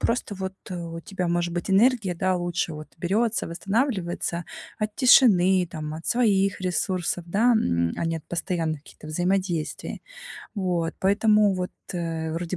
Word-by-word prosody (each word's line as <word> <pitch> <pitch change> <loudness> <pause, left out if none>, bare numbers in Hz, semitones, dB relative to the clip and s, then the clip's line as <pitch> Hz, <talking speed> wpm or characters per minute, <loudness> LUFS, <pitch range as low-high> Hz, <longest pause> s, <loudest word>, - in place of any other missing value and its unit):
просто 230 -3 -1
вот 190 0 -5
у 170 -3 -5
тебя, 180 0 -3
может 175 0 0
быть, 175 +2 -3
энергия, 205 -3 +3
да, 185 +1 +1
лучше 175 -2 -1
вот 155 0 -9
берётся, 215 +6 0
восстанавливается 185 - -1 0.3
от 215 -1 -3
тишины, 190 -8 +6
там, 155 -1 -5
от 160 - -8
своих 200 -6 +2
ресурсов, 180 -1 -1
да, 225 +7 +3
м, 85 - +1
а - - -2
не 165 0 0
от 155 - -9
постоянных 165 -3 -2
каких-то 155 - -14
взаимодействий. 175 0 -2 0.5
Вот, 180 -5 -1
поэтому 205 +3 +3 0.2
вот 180 -1 -3 0.2
вроде 165 +1 -3
180 Hz, 145 wpm, -25 LUFS, 170-200 Hz, 0.5 s, тишины